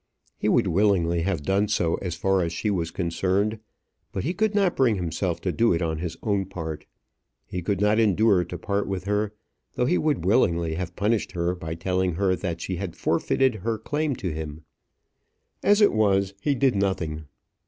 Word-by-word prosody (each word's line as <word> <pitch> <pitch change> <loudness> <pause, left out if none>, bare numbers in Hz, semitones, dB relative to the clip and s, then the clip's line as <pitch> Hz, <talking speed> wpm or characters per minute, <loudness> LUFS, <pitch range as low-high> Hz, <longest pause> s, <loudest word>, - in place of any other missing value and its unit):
He - - -1
would - - +3
willingly 85 -3 +2
have 85 -4 -1
done 100 +6 +1
so 90 -6 +1
as 90 -3 -3
far 95 +2 +1
as 85 -1 -1
she 105 +5 -1
was 85 -4 -1
concerned; 95 +5 0 0.5
but 95 - -3
he 170 - -1
could 215 +2 0
not 195 -4 +2
bring 125 -5 +3
himself 90 -1 -2
to 90 - -1
do 115 +3 +3
it 85 - -1
on 80 -1 -2
his 85 -1 -4
own 100 -3 +1
part. 80 -4 -6 0.6
He 90 - -5
could 100 +3 -1
not 105 +2 +3
endure 105 -3 +4
to 90 +1 -6
part 100 +3 -1
with 95 -2 -3
her, 105 +1 0 0.4
though 125 - 0
he 175 +8 +2
would 150 - 0
willingly 85 -6 +2
have 90 +1 -4
punished 105 0 0
her 85 0 0
by 80 -2 -5
telling 90 +1 0
her 95 0 +2
that 85 -2 -4
she 95 - -3
had 90 -2 -5
forfeited 130 -2 +1
her 115 +2 -1
claim 145 +5 -1
to 95 -6 -3
him. 80 0 -6 1.0
As 205 +1 +4
it 205 - +5
was, 100 -2 +2
he 145 +4 +1
did 130 -2 +2
nothing. 85 -6 -1
95 Hz, 195 wpm, -25 LUFS, 85-105 Hz, 1.0 s, it